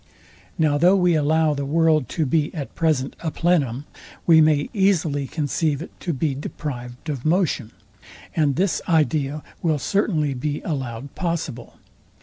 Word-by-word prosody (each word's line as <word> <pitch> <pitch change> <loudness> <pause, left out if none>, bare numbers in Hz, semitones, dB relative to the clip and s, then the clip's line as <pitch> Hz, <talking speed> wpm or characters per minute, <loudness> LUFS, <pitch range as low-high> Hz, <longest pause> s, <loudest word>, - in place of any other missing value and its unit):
Now 150 -3 +2
though 180 +4 +5
we 180 -2 +3
allow 155 0 +2
the 140 -1 -3
world 155 -1 +2
to 160 - -1
be 150 +2 +1
at 145 -4 -5
present 155 -5 0
a 165 - -2
plenum, 145 -6 0 0.4
we 160 -2 +7
may 155 -2 +3
easily 165 - +1
conceive 150 0 -1
it 165 - -8
to 175 - -2
be 145 0 -1
deprived 130 -1 -6
of 140 -5 -3
motion; 155 - +1 0.7
and 145 -4 +2
this 185 +2 +1
idea 150 -2 +1 0.2
will 160 -3 +1
certainly 155 -4 0
be 145 +3 -3
allowed 135 -4 -4
possible. 165 -9 -4
155 Hz, 145 wpm, -23 LUFS, 140-165 Hz, 0.7 s, we